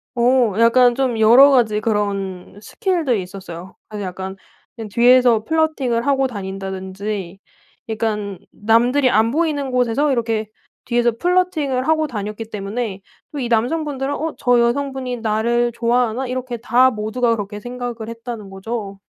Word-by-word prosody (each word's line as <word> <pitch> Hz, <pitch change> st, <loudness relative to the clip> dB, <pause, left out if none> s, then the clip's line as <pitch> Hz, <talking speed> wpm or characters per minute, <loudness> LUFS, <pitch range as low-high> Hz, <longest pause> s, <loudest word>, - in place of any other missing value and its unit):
어. 240 Hz, -2 st, +3 dB
약간 240 Hz, +1 st, +5 dB
좀 255 Hz, -3 st, 0 dB
여러 240 Hz, +6 st, +7 dB
가지 225 Hz, -5 st, +3 dB
그런 200 Hz, -3 st, -3 dB
스킬들이 320 Hz, -, -1 dB
있었어요. 185 Hz, -1 st, -9 dB
그래서 210 Hz, -2 st, -6 dB
약간 190 Hz, +1 st, -6 dB, 0.4 s
그냥 225 Hz, -3 st, -7 dB
뒤에서 240 Hz, 0 st, +4 dB
플러팅을 275 Hz, -5 st, 0 dB
하고 270 Hz, -1 st, +2 dB
다닌다든지 195 Hz, -2 st, -5 dB, 0.5 s
그러니깐 210 Hz, -4 st, -3 dB
남들이 240 Hz, +5 st, +2 dB
안 225 Hz, 0 st, +3 dB
보이는 295 Hz, -3 st, -1 dB
곳에서 250 Hz, +4 st, +1 dB
이렇게 225 Hz, -3 st, -1 dB, 0.4 s
뒤에서 240 Hz, 0 st, +2 dB
플러팅을 315 Hz, -6 st, 0 dB
하고 315 Hz, -1 st, +2 dB
다녔기 210 Hz, -2 st, -5 dB
때문에 205 Hz, 0 st, -4 dB, 0.3 s
또 295 Hz, -, -5 dB
이 245 Hz, -, -2 dB
남성분들은 270 Hz, +4 st, -1 dB
'어. 320 Hz, +1 st, -3 dB
저 245 Hz, -1 st, +3 dB
여성분이 255 Hz, +1 st, -1 dB
나를 235 Hz, +2 st, 0 dB
좋아하나?' 240 Hz, +1 st, +1 dB
이렇게 255 Hz, -1 st, -4 dB
다 245 Hz, +3 st, +4 dB
모두가 230 Hz, +1 st, 0 dB
그렇게 205 Hz, 0 st, -6 dB
생각을 245 Hz, -1 st, -6 dB
했다는 230 Hz, -3 st, -7 dB
거죠. 195 Hz, 0 st, -6 dB
235 Hz, 340 characters per minute, -20 LUFS, 210-255 Hz, 0.5 s, 여러